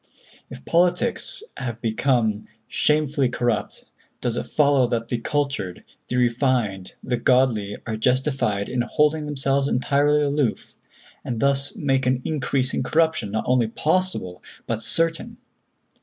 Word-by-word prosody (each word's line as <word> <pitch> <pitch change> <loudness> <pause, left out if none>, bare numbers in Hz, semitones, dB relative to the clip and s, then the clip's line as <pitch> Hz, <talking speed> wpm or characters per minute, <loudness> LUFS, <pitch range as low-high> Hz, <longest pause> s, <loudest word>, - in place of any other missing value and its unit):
If 70 - -11
politics 180 - +1
have 120 -3 -4
become 110 -2 0 0.2
shamefully 150 -3 +1
corrupt, 120 -3 -2 0.3
does 120 -2 -1
it - - -3
follow 140 -4 +3
that 115 -1 -2
the 120 - -1
cultured, 140 -9 -2 0.2
the 125 - -3
refined, 120 -6 0
the 125 -1 -1
godly 120 -6 +2
are 110 -2 -3
justified 125 -4 0
in 125 -1 -1
holding 150 +4 +1
themselves 140 -1 0
entirely 145 +3 +2
aloof, 140 -4 -1 0.4
and 120 -3 -3
thus 140 +2 0
make 135 -2 0
an 130 0 +1
increase 135 -3 -1
in - - 0
corruption 160 -9 +1
not 110 +2 -2
only 125 -2 +2
possible, 155 - -1 0.2
but 115 -1 -2
certain? 165 +5 -1
130 Hz, 130 wpm, -23 LUFS, 115-145 Hz, 0.4 s, follow